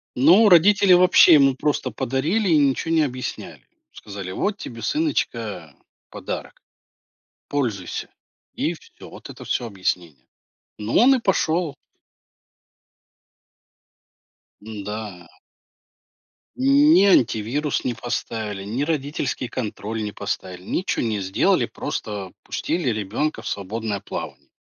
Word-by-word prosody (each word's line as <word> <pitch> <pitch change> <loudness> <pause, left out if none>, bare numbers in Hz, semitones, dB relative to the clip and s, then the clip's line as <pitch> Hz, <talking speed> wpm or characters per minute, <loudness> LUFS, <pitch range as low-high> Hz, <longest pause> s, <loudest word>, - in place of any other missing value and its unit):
Ну, 175 - +6
родители 195 +1 +6
вообще 180 -1 +7
ему 135 -3 +5
просто 150 +2 -1
подарили 145 - -1
и 160 - +5
ничего 145 +3 +1
не 160 - +4
объясняли. 130 -3 -5 0.3
Сказали: 100 -3 -8
"Вот 205 - -2
тебе, 115 - -8
сыночка, 115 - -2 0.4
подарок, - - -7 0.9
пользуйся". 115 -11 -3 0.4
И - - -1
всё, - - -15
вот - - -12
это - - -11
всё 120 - -2
объяснение. 90 - -4 0.5
Ну, 105 +2 -2
он 265 +4 +6
и 255 - 0
пошел. 170 -6 0 2.9
Н-да. 105 -4 -7 1.3
Ни 275 -2 +5
антивирус 135 - +2
не 120 -2 -2
поставили, 110 -4 -4
ни 115 +8 -2
родительский 145 -4 -2
контроль 110 -2 -4
не 105 - -4
поставили, 95 -3 -5
ничего 180 - -2
не 110 -3 -1
сделали, 95 0 +1
просто 100 -3 -5
пустили 165 -5 -2
ребенка 110 +8 -2
в - - -8
свободное 105 +1 -3
плавание. 100 - -8
125 Hz, 110 wpm, -22 LUFS, 105-160 Hz, 2.9 s, вообще